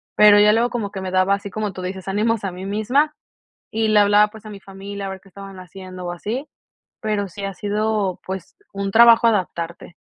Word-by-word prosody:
pero 210 Hz, -1 st, +7 dB
ya 210 Hz, 0 st, +6 dB
luego 235 Hz, +2 st, +2 dB
como 230 Hz, -5 st, -4 dB
que 195 Hz, -, -6 dB
me 185 Hz, -, -4 dB
daba 185 Hz, +1 st, +3 dB
así, 200 Hz, 0 st, -8 dB
como 210 Hz, -1 st, -4 dB
tú 185 Hz, -, -7 dB
dices, 185 Hz, +1 st, -6 dB
ánimos 215 Hz, +3 st, 0 dB
a 195 Hz, -, -2 dB
mí 180 Hz, +2 st, -8 dB
misma 245 Hz, +10 st, +1 dB, 0.6 s
y 220 Hz, 0 st, 0 dB
le 215 Hz, -1 st, +5 dB
hablaba, 205 Hz, +1 st, +5 dB
pues, 220 Hz, 0 st, -14 dB
a 215 Hz, -, -8 dB
mi 200 Hz, -, -9 dB
familia 195 Hz, +1 st, -8 dB
a -, -, -4 dB
ver 190 Hz, -1 st, -8 dB
qué 195 Hz, -, -20 dB
estaban 195 Hz, 0 st, -11 dB
haciendo 185 Hz, 0 st, -10 dB
o 175 Hz, -, -3 dB
así, 230 Hz, -, -5 dB, 0.5 s
pero 210 Hz, -2 st, -1 dB
sí 200 Hz, +3 st, -9 dB
ha 195 Hz, -, -4 dB
sido, 210 Hz, -2 st, -1 dB
pues, 190 Hz, -2 st, -7 dB, 0.2 s
un 195 Hz, 0 st, -3 dB
trabajo 230 Hz, +1 st, +7 dB
adaptarte. 175 Hz, -5 st, -2 dB
200 Hz, 220 wpm, -21 LUFS, 190-215 Hz, 0.6 s, pero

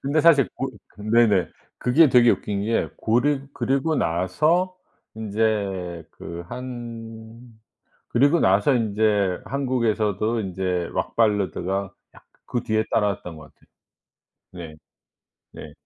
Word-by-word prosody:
근데 140 Hz, +3 st, +1 dB
사실 150 Hz, -4 st, +5 dB
고 135 Hz, 0 st, -3 dB, 0.3 s
네네 105 Hz, -4 st, +3 dB, 0.3 s
그게 145 Hz, +5 st, +4 dB
되게 120 Hz, -1 st, +6 dB
웃긴 100 Hz, -1 st, -1 dB
게 115 Hz, +1 st, 0 dB
고르 135 Hz, +5 st, +1 dB
그리고 140 Hz, +4 st, 0 dB
나서 155 Hz, -, +1 dB, 0.4 s
이제 100 Hz, -5 st, -2 dB
그 85 Hz, +1 st, -8 dB
한 115 Hz, -2 st, -8 dB, 0.7 s
그리고 145 Hz, +7 st, +3 dB
나서 100 Hz, +6 st, +3 dB
인제 105 Hz, -5 st, +1 dB
한국에서도 115 Hz, -5 st, 0 dB
인제 90 Hz, -3 st, -2 dB
락 -, -, -3 dB
발라드가 100 Hz, -3 st, 0 dB, 0.2 s
약간 -, -, -20 dB, 0.2 s
그 120 Hz, -, -2 dB
뒤에 110 Hz, 0 st, 0 dB
따라왔던 100 Hz, -6 st, -1 dB
것 75 Hz, -1 st, -14 dB
같아요. -, -, -29 dB, 0.9 s
네. 85 Hz, -4 st, -9 dB, 0.8 s
네. 75 Hz, -, -10 dB
110 Hz, 225 characters per minute, -23 LUFS, 95-125 Hz, 0.9 s, 되게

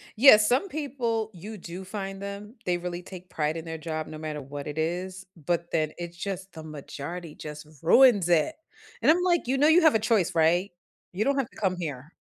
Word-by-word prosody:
Yeah, 235 Hz, 0 st, +9 dB
some 245 Hz, -, +2 dB
people, 245 Hz, -8 st, -2 dB
you 205 Hz, +5 st, -8 dB
do 180 Hz, 0 st, -8 dB
find 195 Hz, 0 st, -5 dB
them, 200 Hz, +3 st, -7 dB
they 180 Hz, -1 st, +1 dB
really 175 Hz, 0 st, -5 dB
take 185 Hz, 0 st, -11 dB
pride 155 Hz, +1 st, -1 dB
in 165 Hz, -, -7 dB
their 160 Hz, 0 st, -5 dB
job 155 Hz, -1 st, -4 dB
no 155 Hz, -, -8 dB
matter 155 Hz, -1 st, -5 dB
what 140 Hz, +1 st, -7 dB
it 150 Hz, +1 st, -6 dB
is, 180 Hz, +4 st, -3 dB
but 170 Hz, +1 st, -2 dB
then 155 Hz, -2 st, +1 dB
it's 175 Hz, 0 st, -7 dB
just 190 Hz, 0 st, -5 dB
the 160 Hz, -, -9 dB
majority 155 Hz, +2 st, -7 dB
just 150 Hz, 0 st, -8 dB
ruins 205 Hz, 0 st, +6 dB
it, 170 Hz, -, +3 dB, 0.5 s
and -, -, +6 dB
I'm, 355 Hz, +3 st, +2 dB
like, 345 Hz, -7 st, +2 dB
"You 265 Hz, +2 st, +1 dB
know 290 Hz, +3 st, +5 dB
you 335 Hz, +3 st, +6 dB
have 315 Hz, -7 st, +5 dB
a -, -, +4 dB
choice, 210 Hz, -5 st, +1 dB
right? 170 Hz, +4 st, +3 dB, 0.4 s
You 190 Hz, +4 st, -1 dB
don't 280 Hz, 0 st, +2 dB
have 270 Hz, -4 st, 0 dB
to -, -, -19 dB
come 190 Hz, -3 st, 0 dB
here." 150 Hz, -3 st, -6 dB
180 Hz, 215 wpm, -27 LUFS, 160-220 Hz, 0.5 s, Yeah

